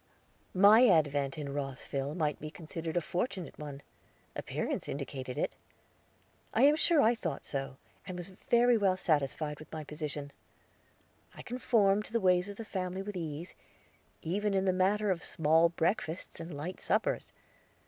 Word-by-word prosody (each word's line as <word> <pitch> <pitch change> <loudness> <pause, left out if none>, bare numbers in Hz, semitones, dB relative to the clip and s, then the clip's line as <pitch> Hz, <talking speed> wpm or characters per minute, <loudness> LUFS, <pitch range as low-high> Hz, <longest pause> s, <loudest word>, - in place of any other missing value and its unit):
My 210 +6 +8
advent 145 - +2
in 140 -2 -4
Rosville 140 +1 -3
might 150 -4 0
be 155 - -5
considered 165 +1 -5
a - - +3
fortunate 180 - -3
one; 145 -2 -7 0.5
appearances - - -3
indicated 135 -2 -5
it; - - -1 1.0
I 230 - +4
am 290 +2 +7
sure 315 -1 +5
I 230 - +5
thought 170 - -4
so, 135 -1 -4 0.3
and 185 -2 -5
was 175 +1 -6
very 235 +5 +3
well 190 -2 +3
satisfied 150 -3 0
with 155 - -13
my 155 -1 -5
position. 150 -1 -5 1.0
I - - -9
conformed 215 -5 +2
to - - -13
the 230 - +3
ways 180 -1 +3
of 200 - -8
the 225 - -6
family 185 -2 -3
with 205 0 -6
ease, 165 0 -5 0.7
even 200 +4 0
in 190 0 +2
the 185 - +3
matter 200 +3 +2
of 180 -1 -2
small 160 +2 +3
breakfasts 170 0 -2
and 165 +1 -7
light 155 +5 -6
suppers. - - 0
175 Hz, 160 wpm, -31 LUFS, 150-200 Hz, 1.0 s, My